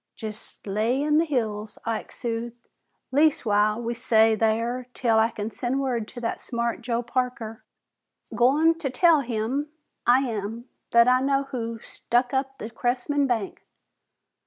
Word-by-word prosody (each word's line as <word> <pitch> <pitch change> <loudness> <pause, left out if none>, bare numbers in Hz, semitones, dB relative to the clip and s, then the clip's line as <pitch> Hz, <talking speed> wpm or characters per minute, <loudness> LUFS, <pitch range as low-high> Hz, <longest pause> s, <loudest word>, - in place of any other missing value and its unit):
"Jest 215 -1 -9
lay 215 +6 0
in 300 +1 +3
the 330 - +2
hills," 220 -7 -2
Ike 225 -1 -3
soothed. 235 0 -5 0.4
"Leastwise 215 -8 +3
we'll 235 +1 -2 0.2
lay 220 0 +6
thar 230 +3 0
'til 225 -3 +2
I 225 +1 +4
can 215 -1 -5
send 255 +4 -2
word 245 -5 -1
to 245 - -9
that 230 - -3
smart 235 -1 -2
Joe 235 0 -1
Parker. 240 -3 -3 0.7
Goin' 295 +7 +4
to 290 -5 -2
tell 320 +5 +4
him, 250 +4 -2 0.4
I 250 +2 +6
am, 225 -2 -4 0.2
that 235 0 +5
I 255 0 +4
know 275 0 +2
who 230 -4 -4
stuck 245 +2 -1
up 270 0 -1
the 220 - -7
Cressman 260 +4 0
bank. 225 -6 -2
240 Hz, 150 wpm, -25 LUFS, 225-265 Hz, 0.7 s, lay